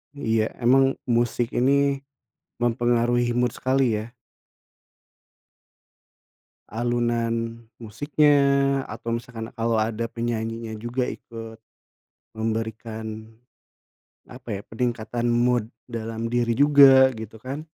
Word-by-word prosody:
Iya, 110 -5 +1 0.2
emang 135 +2 +4
musik 120 -1 0
ini 140 +2 +2 0.6
mempengaruhi 120 0 +1
mood 125 -1 +2
sekali 130 -4 +1
ya. 115 +3 -9 2.6
Alunan 115 0 -1 0.2
musiknya, 145 +7 +2 0.6
atau 115 +1 -3
misalkan 115 -1 -7
kalau 115 -1 0
ada 110 +1 -1
penyanyinya 115 -1 -3
juga 120 +3 -2
ikut 115 -1 -8 0.8
memberikan, 110 0 -4 1.0
apa 120 -5 -7
ya, - - -9
peningkatan 120 0 -2
mood 120 -1 +1 0.2
dalam 115 -1 -4
diri 120 0 0
juga 135 -1 +6
gitu 110 0 -9
kan. 135 +6 -6
115 Hz, 90 wpm, -24 LUFS, 115-125 Hz, 2.6 s, juga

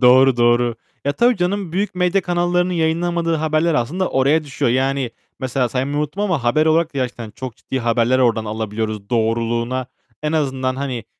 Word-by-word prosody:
Doğru, 130 +1 +6
doğru. 120 0 +3 0.3
Ya, 140 - +1
tabii 240 +9 +3
canım 180 -1 -1
büyük 200 +1 -1
medya 180 +2 +2
kanallarının 175 +1 +1
yayınlamadığı 170 0 0
haberler 155 +1 +1
aslında 165 +11 0
oraya 145 +4 +2
düşüyor. 140 -2 -1
Yani, 130 0 0 0.3
mesela 130 -1 0
saymayı 135 +4 -2
unuttum 150 +7 -2
ama 170 - 0
haber 155 +6 +3
olarak 160 -1 +2
da - - -2
gerçekten 120 -3 -3
çok 120 +2 -7
ciddi 130 - -4
haberler 120 +2 +2
oradan 115 -3 +2
alabiliyoruz 110 -1 -4
doğruluğuna, 115 +2 0 0.4
en 150 +1 -1
azından 130 -4 0
hani, 130 -5 -3
135 Hz, 165 wpm, -20 LUFS, 120-165 Hz, 0.4 s, Doğru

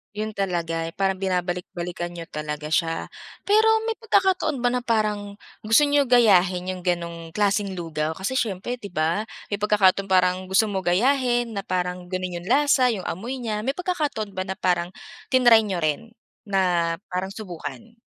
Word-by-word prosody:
'Yon 215 +1 -3
talaga, 170 -5 -2
eh, 165 - -9
parang 195 -1 0
binabalik-balikan 180 -2 -3
niyo 170 - -6
talaga 150 0 -5
siya. 165 +1 0 0.3
Pero 430 +2 +4 0.2
may 450 0 -3
pagkakataon 380 - +1
ba 245 - +3
na 250 - 0
parang 210 -4 -1 0.2
gusto 225 +6 +4
niyo 285 -1 +3
gayahin 185 -7 +4
'yong 185 - -6
gano'ng 170 -2 -3
klaseng 205 -1 +1
lugaw? 160 -2 -3
Kasi 190 +7 -3
siyempre, 225 +3 -3
'di 205 - -7
ba, 165 +8 0 0.2
may 205 - -1
pagkakataon 200 -2 +3
parang 185 0 +2
gusto 205 +3 +2
mo 195 - -1
gayahin 240 +5 +2
na 200 -3 -5
parang 180 0 -2
gano'n 185 -1 -3
'yong 175 - -12
lasa, 285 -1 +4
'yong 215 -6 -1
amoy 245 +10 -5
niya. 215 -2 -2
May 265 +6 -2
pagkakataon 305 - -2
ba 185 -1 -4
na 190 - -3
parang 175 -2 0 0.4
tinry 245 -3 +6
niyo 180 -4 -2
rin 155 +10 -2 0.3
na 180 -4 +1 0.2
parang 185 +1 -2
subukan? 225 +3 -8
195 Hz, 165 wpm, -24 LUFS, 180-230 Hz, 0.4 s, tinry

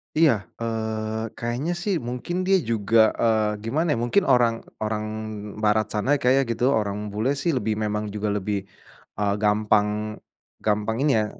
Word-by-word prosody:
Iya. 155 -3 +5 0.3
Eee, 110 -1 -2
kayaknya 120 +8 -2
sih, 200 0 0
mungkin 125 +8 -4
dia 195 - +5
juga, 110 -1 +3
eee, 110 -2 +2
gimana 155 +9 0
ya, - - +1
mungkin 150 +11 +3
orang 120 -3 +3 0.2
orang 110 0 -1 0.6
barat 110 0 +2
sana 120 +7 +2
kayaknya 135 0 +3
gitu, 120 - -4
orang 105 -2 -1
bule 120 +7 0
sih 170 +5 0
lebih 110 -2 -1
memang 105 0 -1
juga 105 0 -1
lebih, 100 -1 -2 0.6
eee, 100 -1 +2
gampang, 105 0 +2 0.5
gampang 105 +1 0
ini 150 - +3
ya, 105 - +1
110 Hz, 155 wpm, -24 LUFS, 105-125 Hz, 0.6 s, Iya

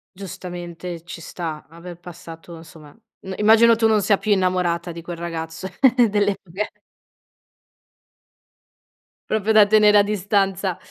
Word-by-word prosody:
Giustamente 175 -2 -8
ci 175 - -9
sta, 160 -2 -7
aver 170 +1 -11
passato 170 -1 -12
insomma 160 -2 -15 0.4
immagino, 225 +2 +5
tu 225 0 +3
non 215 -1 +2
sia 200 +1 +2
più 210 +2 -3
innamorata 180 -2 -1
di 170 0 -9
quel 175 +1 -7
ragazzo 165 +1 -6 0.4
delle 205 -1 +1
fughe. 195 +4 -7 2.5
Proprio 220 0 0
da 215 -1 +7
tenere 210 0 +5
a - - +7
distanza. 195 -2 -1
180 Hz, 120 wpm, -21 LUFS, 170-205 Hz, 2.5 s, da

